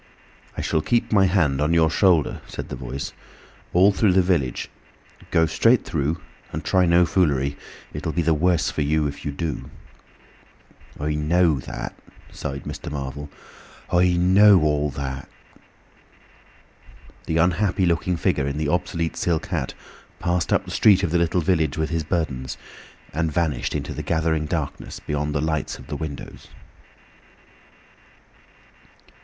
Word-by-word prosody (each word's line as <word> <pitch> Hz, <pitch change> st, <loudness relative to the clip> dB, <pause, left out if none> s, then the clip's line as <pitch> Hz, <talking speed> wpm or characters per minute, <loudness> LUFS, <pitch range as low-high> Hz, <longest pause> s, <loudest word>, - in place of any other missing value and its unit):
"I -, -, -1 dB
shall 80 Hz, -, 0 dB
keep 120 Hz, +7 st, 0 dB
my 100 Hz, -3 st, +5 dB
hand 80 Hz, -8 st, +2 dB
on 75 Hz, +3 st, +2 dB
your 80 Hz, -1 st, +4 dB
shoulder," 90 Hz, -7 st, +2 dB
said -, -, -7 dB
the -, -, -4 dB
Voice, 70 Hz, +1 st, -6 dB, 0.6 s
"all 95 Hz, +3 st, +5 dB
through 100 Hz, -1 st, +2 dB
the 95 Hz, 0 st, +4 dB
village. 80 Hz, -9 st, 0 dB, 0.6 s
Go 80 Hz, -, +3 dB
straight 115 Hz, +8 st, +3 dB
through 80 Hz, +2 st, -1 dB, 0.3 s
and -, -, -5 dB
try 95 Hz, -1 st, +3 dB
no 85 Hz, +1 st, +5 dB
foolery. 70 Hz, -6 st, +1 dB, 0.4 s
It -, -, -6 dB
will -, -, -1 dB
be 85 Hz, +1 st, 0 dB
the 80 Hz, 0 st, +3 dB
worse 85 Hz, +2 st, +2 dB
for -, -, -2 dB
you 75 Hz, +1 st, +1 dB
if 70 Hz, 0 st, -5 dB
you 75 Hz, -, -1 dB
do." 75 Hz, -1 st, -4 dB, 1.3 s
"I 75 Hz, +1 st, -1 dB
know 80 Hz, 0 st, +2 dB
that," -, -, -6 dB, 0.4 s
sighed 70 Hz, -1 st, -5 dB
Mr. -, -, -6 dB
Marvel, 70 Hz, 0 st, -5 dB, 0.6 s
"I 90 Hz, 0 st, +4 dB
know 95 Hz, +2 st, +6 dB
all 75 Hz, -1 st, +1 dB
that." 70 Hz, 0 st, -5 dB, 2.0 s
The 80 Hz, -, 0 dB
unhappy 90 Hz, +3 st, +2 dB
looking 85 Hz, +1 st, +1 dB
figure 70 Hz, -3 st, 0 dB
in 70 Hz, +1 st, -3 dB
the 75 Hz, -1 st, -1 dB
obsolete 85 Hz, -1 st, -1 dB
silk 85 Hz, -3 st, 0 dB
hat -, -, -2 dB, 0.4 s
passed 85 Hz, -1 st, -1 dB
up -, -, +2 dB
the -, -, -8 dB
street 100 Hz, -3 st, +5 dB
of 85 Hz, -, 0 dB
the 85 Hz, -, +2 dB
little 85 Hz, +1 st, +1 dB
village 80 Hz, -5 st, +1 dB
with 80 Hz, 0 st, -1 dB
his 80 Hz, -1 st, 0 dB
burdens, 75 Hz, -6 st, -2 dB, 0.6 s
and 80 Hz, +2 st, 0 dB
vanished 75 Hz, -5 st, -1 dB
into -, -, -3 dB
the -, -, -5 dB
gathering 80 Hz, -1 st, 0 dB
darkness 80 Hz, -3 st, -4 dB
beyond 75 Hz, 0 st, -3 dB
the 70 Hz, -, +1 dB
lights 80 Hz, -3 st, -2 dB
of -, -, -13 dB
the -, -, -5 dB
windows. 80 Hz, -3 st, -7 dB
80 Hz, 150 wpm, -23 LUFS, 75-90 Hz, 2.0 s, know